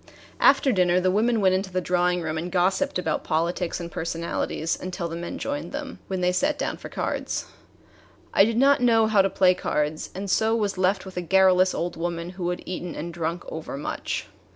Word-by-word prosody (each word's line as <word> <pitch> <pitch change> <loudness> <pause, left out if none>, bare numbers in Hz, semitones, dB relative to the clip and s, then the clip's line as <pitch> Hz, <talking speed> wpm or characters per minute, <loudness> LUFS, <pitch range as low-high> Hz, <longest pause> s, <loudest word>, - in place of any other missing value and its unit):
After 275 0 +5
dinner 180 -4 +3
the 185 0 +2
women 225 +3 +2
went 190 -1 +4
into 190 0 -1
the 185 - 0
drawing 180 0 +1
room 155 0 -2
and 170 +3 -4
gossiped 190 +10 +1
about 160 -4 -1
politics 170 +2 -1
and 170 -1 -6
personalities 165 0 -2
until 180 -2 -4
the 165 - -6
men 170 0 -5
joined 285 +1 -4
them, 285 -2 -6
when 190 -1 -3
they 180 0 +3
sat 290 +10 +1
down - - -2
to - - -9
cards. - - -3 0.9
I - - +6
did 225 +2 +1
not 275 +1 +5
know 225 -2 +4
how 215 -2 +4
to 195 - +1
play 185 -1 +4
cards, 150 -3 -2
and 195 +2 -4
so 220 +4 +2
was 205 -3 0
left 185 +1 +1
with 190 -1 -10
a - - 0
garrulous 185 +1 +4
old 175 0 -3
woman 170 +1 -3
who 175 -1 -3
had 180 - -4
eaten 180 -1 -5
and 170 +3 -5
drunk 170 +1 -3
over 160 -3 -6
much. 145 - -3
180 Hz, 205 wpm, -25 LUFS, 170-200 Hz, 0.9 s, I